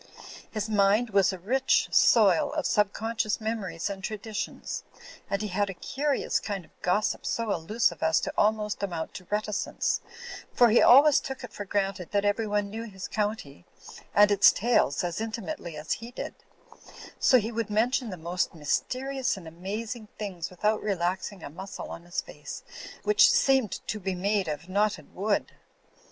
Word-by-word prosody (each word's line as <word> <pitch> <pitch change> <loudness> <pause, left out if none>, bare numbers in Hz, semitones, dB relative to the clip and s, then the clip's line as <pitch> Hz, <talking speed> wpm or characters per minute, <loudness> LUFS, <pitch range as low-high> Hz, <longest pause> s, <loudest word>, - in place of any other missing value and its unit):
His 215 -1 -3
mind 210 +2 +3
was 195 -1 +4
a 190 - -5
rich 260 +9 +2
soil 235 +6 +5
of 305 -2 -2
subconscious 215 +1 0
memories 215 -6 -3
and 195 -1 -6
traditions; 215 +1 -4 0.5
and 200 +1 -1
he 210 - -3
had 200 +2 0
a 195 - -6
curious 280 +8 -1
kind 195 -5 -5
of - - -25
gossip 205 +4 0
so 230 -3 -1
allusive 175 +1 0
as 160 0 +3
to - - -3
almost 210 0 +1
amount 170 -5 -3
to 185 - -9
reticence; 210 0 -1 0.5
for 240 -1 +6
he 225 - +5
always 285 +3 +7
took 265 -1 -7
it 240 - -8
for 205 - -6
granted 195 -2 -2
that 200 0 +2
everyone 205 -1 0
knew 225 +2 -5
his 190 -4 -7
county 210 - -3 0.5
and 205 0 +6
its 200 -1 +7
tales 220 - +1
as 175 +3 -2
intimately 225 - -5
as 150 +1 -6
he 230 - -2
did; 245 - -6 0.9
so 255 - +6
he 225 -1 -1
would 230 -2 -2
mention 235 +3 +1
the 185 - -6
most 175 +2 -2
mysterious 255 - -1
and 175 -4 -10
amazing 210 +7 -5
things 190 -6 -5
without 210 +4 0
relaxing 185 -1 -2
a - - -6
muscle 190 +5 -8
on 170 - -8
his 175 - -2
face, - - -9 0.4
which 475 +4 +6
seemed 270 - +2
to 215 - -2
be 190 -1 -2
made 200 +1 0
of 155 +3 -4
knot 205 +3 +2
ted 155 -6 -12
wood. 205 +2 0
205 Hz, 170 wpm, -27 LUFS, 190-225 Hz, 0.9 s, always